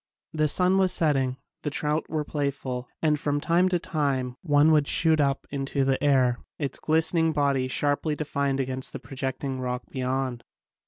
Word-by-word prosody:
The 155 Hz, -1 st, +2 dB
sun 185 Hz, +5 st, +3 dB
was 190 Hz, -1 st, +3 dB
setting, 135 Hz, -7 st, +1 dB, 0.2 s
the 150 Hz, -, -2 dB
trout 150 Hz, +1 st, -2 dB
were 155 Hz, -1 st, -1 dB
playful 140 Hz, -4 st, -3 dB, 0.2 s
and 150 Hz, -2 st, +2 dB
from 145 Hz, -1 st, 0 dB
time 175 Hz, +4 st, +2 dB
to 180 Hz, -, +2 dB
time 140 Hz, -6 st, -1 dB
one 150 Hz, -1 st, +4 dB
would 150 Hz, -2 st, +3 dB
shoot 160 Hz, -1 st, +3 dB
up 140 Hz, -1 st, +1 dB
into 140 Hz, 0 st, -1 dB
the 135 Hz, 0 st, 0 dB
air, 130 Hz, -4 st, +3 dB, 0.2 s
its 140 Hz, -3 st, -3 dB
glistening 160 Hz, +1 st, +2 dB
body 140 Hz, -3 st, +1 dB
sharply 145 Hz, +3 st, 0 dB
defined 140 Hz, -2 st, -1 dB
against 130 Hz, 0 st, -3 dB
a -, -, -4 dB
projecting 135 Hz, 0 st, -4 dB
rock 125 Hz, 0 st, -3 dB
beyond. 130 Hz, -2 st, -2 dB
145 Hz, 165 wpm, -26 LUFS, 130-155 Hz, 0.2 s, one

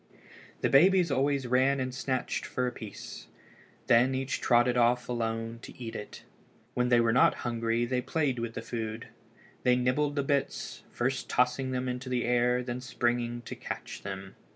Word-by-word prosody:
The -, -, +2 dB
babies 175 Hz, +3 st, +5 dB
always 135 Hz, 0 st, +1 dB
ran 130 Hz, +3 st, +3 dB
and 130 Hz, -1 st, -2 dB
snatched 130 Hz, -1 st, -2 dB
for 125 Hz, -, -2 dB
a 125 Hz, -, -1 dB
piece. 110 Hz, -4 st, -9 dB, 0.6 s
Then 125 Hz, +3 st, +4 dB
each 135 Hz, 0 st, -2 dB
trotted 120 Hz, 0 st, +4 dB
off 120 Hz, 0 st, +3 dB
alone 115 Hz, -1 st, -2 dB
to -, -, -11 dB
eat 115 Hz, -2 st, -6 dB
it. 105 Hz, -, -8 dB, 0.5 s
When 125 Hz, 0 st, +1 dB
they 120 Hz, -1 st, +5 dB
were 115 Hz, -1 st, +3 dB
not 125 Hz, -, +5 dB
hungry 115 Hz, 0 st, 0 dB
they 125 Hz, +1 st, 0 dB
played 140 Hz, -4 st, 0 dB
with 115 Hz, 0 st, -4 dB
the 115 Hz, -, -4 dB
food. 110 Hz, -1 st, -5 dB, 0.5 s
They 125 Hz, 0 st, +4 dB
nibbled 130 Hz, +4 st, +1 dB
the 140 Hz, -, +1 dB
bits, 140 Hz, 0 st, -2 dB
first 130 Hz, +2 st, -2 dB
tossing 125 Hz, +1 st, +1 dB
them 130 Hz, 0 st, -2 dB
into 125 Hz, +1 st, -4 dB
the 125 Hz, -1 st, 0 dB
air 125 Hz, 0 st, +3 dB
and 125 Hz, -, -3 dB
then 125 Hz, 0 st, -4 dB
springing 120 Hz, -1 st, -1 dB
to -, -, -7 dB
catch -, -, -6 dB
them. 95 Hz, -1 st, -7 dB
125 Hz, 175 wpm, -29 LUFS, 120-130 Hz, 0.6 s, babies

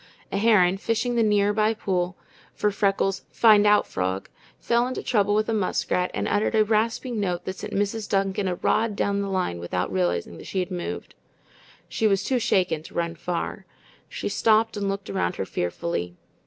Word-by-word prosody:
A -, -, -1 dB
heron, 195 Hz, -4 st, +4 dB
fishing 230 Hz, +4 st, -1 dB
the 235 Hz, -, +2 dB
near 205 Hz, -1 st, +3 dB
by 215 Hz, +1 st, +2 dB
pool 185 Hz, -3 st, -2 dB, 0.4 s
for 210 Hz, -, +1 dB
Freckles' 195 Hz, -1 st, 0 dB
"find 210 Hz, -2 st, +5 dB
out" 210 Hz, 0 st, +5 dB
frog, 95 Hz, +1 st, -3 dB, 0.3 s
fell 235 Hz, +1 st, +1 dB
into 255 Hz, -, -4 dB
trouble 205 Hz, -2 st, +2 dB
with 215 Hz, 0 st, +1 dB
a 225 Hz, -, 0 dB
muskrat 180 Hz, -3 st, 0 dB
and -, -, -1 dB
uttered 205 Hz, +2 st, +1 dB
a 215 Hz, -1 st, +4 dB
rasping 225 Hz, +2 st, 0 dB
note 180 Hz, -4 st, -2 dB
that 185 Hz, 0 st, -4 dB
sent -, -, -7 dB
Mrs. 205 Hz, +2 st, -1 dB
Duncan 195 Hz, 0 st, 0 dB
a 180 Hz, -, -1 dB
rod 220 Hz, +3 st, +1 dB
down 200 Hz, 0 st, 0 dB
the 200 Hz, -, -3 dB
line 185 Hz, -, -1 dB
without 90 Hz, +2 st, -3 dB
realizing 85 Hz, -2 st, -1 dB
that -, -, -11 dB
she -, -, -5 dB
had 185 Hz, +1 st, -2 dB
moved. 175 Hz, -1 st, -5 dB, 0.7 s
She 220 Hz, -, +1 dB
was 195 Hz, -1 st, +2 dB
too 255 Hz, +2 st, +1 dB
shaken 180 Hz, -8 st, +1 dB
to 160 Hz, -, -14 dB
run 170 Hz, -1 st, -1 dB
far. 170 Hz, +1 st, -4 dB, 0.4 s
She -, -, -4 dB
stopped 225 Hz, 0 st, +2 dB
and 200 Hz, -1 st, -1 dB
looked 195 Hz, 0 st, -4 dB
around 190 Hz, -2 st, -1 dB
her -, -, -3 dB
fearfully. 90 Hz, -, -3 dB
200 Hz, 190 wpm, -25 LUFS, 180-215 Hz, 0.7 s, find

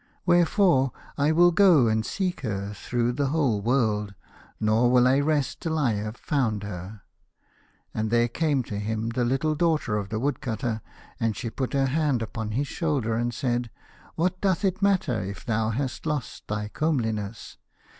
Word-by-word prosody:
Wherefore 175 Hz, -5 st, +4 dB, 0.2 s
I 145 Hz, +2 st, +2 dB
will 175 Hz, +2 st, +5 dB
go 170 Hz, -, +5 dB
and 110 Hz, 0 st, +1 dB
seek 185 Hz, -, -2 dB
her 100 Hz, -4 st, -3 dB
through 120 Hz, +4 st, -1 dB
the 140 Hz, +3 st, 0 dB
whole 135 Hz, -8 st, +1 dB
world, 105 Hz, -4 st, 0 dB, 0.4 s
nor 110 Hz, +3 st, +3 dB
will 125 Hz, 0 st, +5 dB
I 135 Hz, +2 st, +4 dB
rest 145 Hz, -2 st, 0 dB
till 160 Hz, -1 st, -1 dB
I 140 Hz, -6 st, +2 dB
have 105 Hz, +3 st, -4 dB
found 115 Hz, -8 st, -1 dB
her." 100 Hz, +1 st, -7 dB, 0.9 s
And 110 Hz, 0 st, -1 dB
there 120 Hz, +1 st, +3 dB
came 140 Hz, +1 st, 0 dB
to 105 Hz, -3 st, -5 dB
him 110 Hz, +2 st, -2 dB
the 120 Hz, +1 st, -1 dB
little 135 Hz, +6 st, +1 dB
daughter 155 Hz, -9 st, +1 dB
of 100 Hz, -1 st, -4 dB
the 110 Hz, +1 st, -2 dB
Woodcutter, 115 Hz, -4 st, -2 dB, 0.4 s
and 115 Hz, -2 st, 0 dB
she 115 Hz, -2 st, -4 dB
put 130 Hz, +1 st, -3 dB
her 135 Hz, -1 st, +2 dB
hand 135 Hz, -3 st, +1 dB
upon 110 Hz, -1 st, -5 dB
his 140 Hz, +5 st, 0 dB
shoulder 140 Hz, -10 st, -1 dB
and 120 Hz, +2 st, 0 dB
said, 120 Hz, -1 st, -1 dB, 0.2 s
" -, -, -25 dB
What 180 Hz, +2 st, 0 dB
doth 195 Hz, 0 st, +1 dB
it 190 Hz, 0 st, 0 dB
matter 185 Hz, -, +2 dB
if 100 Hz, +1 st, -7 dB
thou 110 Hz, -2 st, 0 dB
hast 130 Hz, +4 st, -3 dB
lost 150 Hz, -5 st, -4 dB
thy 105 Hz, 0 st, -3 dB
comeliness 110 Hz, -, -2 dB
125 Hz, 175 wpm, -26 LUFS, 110-150 Hz, 0.9 s, will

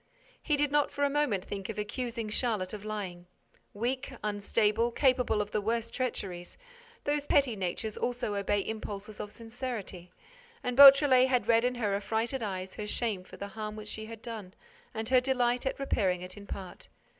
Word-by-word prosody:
He 300 Hz, -2 st, +1 dB
did 290 Hz, 0 st, +1 dB
not 295 Hz, -1 st, +3 dB
for 285 Hz, -, -2 dB
a 285 Hz, -, +3 dB
moment 275 Hz, -11 st, +1 dB
think 195 Hz, 0 st, -5 dB
of 225 Hz, -, -5 dB
accusing 230 Hz, +2 st, -3 dB
Charlotte 210 Hz, -4 st, -1 dB
of 205 Hz, -1 st, -6 dB
lying. 190 Hz, -5 st, -5 dB, 0.4 s
Weak, 255 Hz, +6 st, -2 dB
unstable, 210 Hz, +2 st, +1 dB
capable 250 Hz, -4 st, +2 dB
of 205 Hz, -, -13 dB
the 210 Hz, -, 0 dB
worst 230 Hz, +2 st, -1 dB
treacheries, 190 Hz, -9 st, -4 dB, 0.5 s
those 290 Hz, 0 st, -1 dB
petty 275 Hz, -5 st, +3 dB
natures 195 Hz, +3 st, -3 dB
also 245 Hz, -3 st, -1 dB
obey 200 Hz, 0 st, +1 dB
impulses 210 Hz, -1 st, -5 dB
of 205 Hz, -, -5 dB
sincerity; 225 Hz, -7 st, -6 dB, 0.5 s
and 250 Hz, -, -1 dB
Beautrelet 275 Hz, -1 st, +9 dB
had 250 Hz, -2 st, +1 dB
read 230 Hz, 0 st, +5 dB
in 250 Hz, 0 st, +1 dB
her 215 Hz, -5 st, 0 dB
affrighted 225 Hz, +6 st, -1 dB
eyes 190 Hz, -3 st, -4 dB
her 210 Hz, -, -5 dB
shame 210 Hz, -4 st, -1 dB
for -, -, -13 dB
the 200 Hz, -, -6 dB
harm 215 Hz, +1 st, -5 dB
which 215 Hz, -1 st, -8 dB
she 220 Hz, 0 st, -5 dB
had 225 Hz, -1 st, -10 dB
done 215 Hz, -6 st, -7 dB, 0.4 s
and 220 Hz, 0 st, -4 dB
her 255 Hz, -1 st, +5 dB
delight 250 Hz, -1 st, +1 dB
at -, -, -1 dB
repairing 190 Hz, -9 st, 0 dB
it 180 Hz, 0 st, -8 dB
in 200 Hz, -1 st, -11 dB
part. 185 Hz, -2 st, -8 dB
220 Hz, 180 wpm, -30 LUFS, 205-250 Hz, 0.5 s, Beautrelet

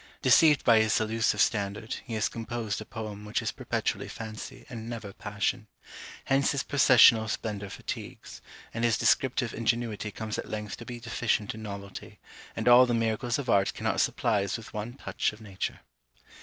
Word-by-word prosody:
Deceived 155 Hz, -3 st, +6 dB
by 115 Hz, -2 st, +6 dB
his 110 Hz, -1 st, +3 dB
illusive 115 Hz, +1 st, 0 dB
standard, 105 Hz, +1 st, 0 dB
he 115 Hz, -3 st, -5 dB
has 110 Hz, -, +1 dB
composed 115 Hz, -2 st, -4 dB
a -, -, -7 dB
poem 105 Hz, -2 st, -7 dB
which 105 Hz, 0 st, -1 dB
is -, -, -2 dB
perpetually -, -, -2 dB
fancy, 110 Hz, -1 st, -8 dB
and 115 Hz, -3 st, -7 dB
never 110 Hz, -4 st, -6 dB
passion. 105 Hz, +3 st, -2 dB, 0.6 s
Hence 135 Hz, +1 st, +2 dB
his 140 Hz, -, -1 dB
processional 120 Hz, -5 st, +6 dB
splendour 105 Hz, -2 st, -4 dB
fatigues, -, -, -7 dB, 0.3 s
and 115 Hz, -, -3 dB
his 115 Hz, -2 st, +3 dB
descriptive 130 Hz, -3 st, +2 dB
ingenuity 115 Hz, -2 st, -1 dB
comes 110 Hz, +1 st, -5 dB
at -, -, -6 dB
length 105 Hz, -1 st, -5 dB
to 120 Hz, -, -10 dB
be 120 Hz, 0 st, -7 dB
deficient 115 Hz, -2 st, -1 dB
in 110 Hz, -, -9 dB
novelty, 100 Hz, 0 st, -8 dB, 0.4 s
and -, -, -3 dB
all 125 Hz, +1 st, +8 dB
the 120 Hz, -, +1 dB
miracles 115 Hz, +1 st, 0 dB
of 140 Hz, -3 st, -5 dB
art 100 Hz, -4 st, +2 dB
cannot -, -, 0 dB
supply 110 Hz, -4 st, +1 dB
us 100 Hz, +2 st, -2 dB
with 115 Hz, -, -12 dB
one 105 Hz, +3 st, -4 dB
touch 135 Hz, -, -2 dB
of 105 Hz, -, -14 dB
nature. 100 Hz, -4 st, -5 dB
110 Hz, 175 wpm, -28 LUFS, 105-120 Hz, 0.6 s, all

